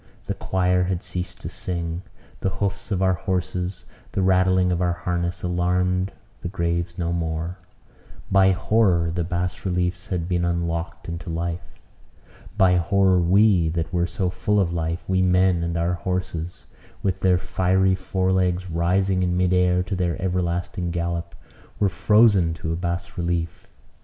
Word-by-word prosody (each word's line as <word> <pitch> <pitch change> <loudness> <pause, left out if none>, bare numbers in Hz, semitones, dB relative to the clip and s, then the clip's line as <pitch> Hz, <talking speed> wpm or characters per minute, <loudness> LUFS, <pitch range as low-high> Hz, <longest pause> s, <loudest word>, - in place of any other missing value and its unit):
The - - -2
choir 90 -1 +1
had 90 -1 -2
ceased 90 -1 -5
to - - -5
sing. 85 -1 -3 0.4
The 95 - 0
hoofs 100 +1 -3
of 95 -2 0
our 95 0 +4
horses, 90 -1 -3 0.3
the 95 - 0
rattling 95 0 +3
of 90 0 0
our 90 -1 +2
harness, 85 +1 -3
alarmed 90 +1 +1 0.3
the - - -4
graves 85 -1 -2
no 85 -1 -1
more. 85 +2 -3 0.7
By 95 0 +6
horror 95 -3 +2
the 85 0 -1
bas 90 +1 -3
relief 90 -1 -1
had 85 -3 -2
been 90 -1 0
unlocked 85 -1 -2
into 85 0 -5
life. 85 +1 -4 0.8
By 95 -3 +5
horror 95 +1 +3
we, 90 -1 +4
that 85 +1 -3
were 85 0 +1
so 90 +1 -1
full 100 +3 0
of 85 -3 +1
life, 85 0 -2
we 95 0 +2
men 90 -1 +3
and 85 0 -2
our 85 +1 +1
horses, 90 -1 -4 0.4
with 95 -1 0
their 95 -1 +3
fiery 95 +1 +2
fore 95 0 -1
legs 90 -1 0
rising 90 +3 +1
in 90 -1 +1
mid 90 0 +2
air 90 0 +3
to 95 +2 -3
their 90 -1 -1
everlasting 90 0 -1
gallop, 85 0 -3 0.4
were 100 - +3
frozen 100 -3 +4
to 80 0 -3
a - - -1
bas 85 +2 -4
relief. 85 -1 -2
90 Hz, 160 wpm, -23 LUFS, 85-95 Hz, 0.8 s, By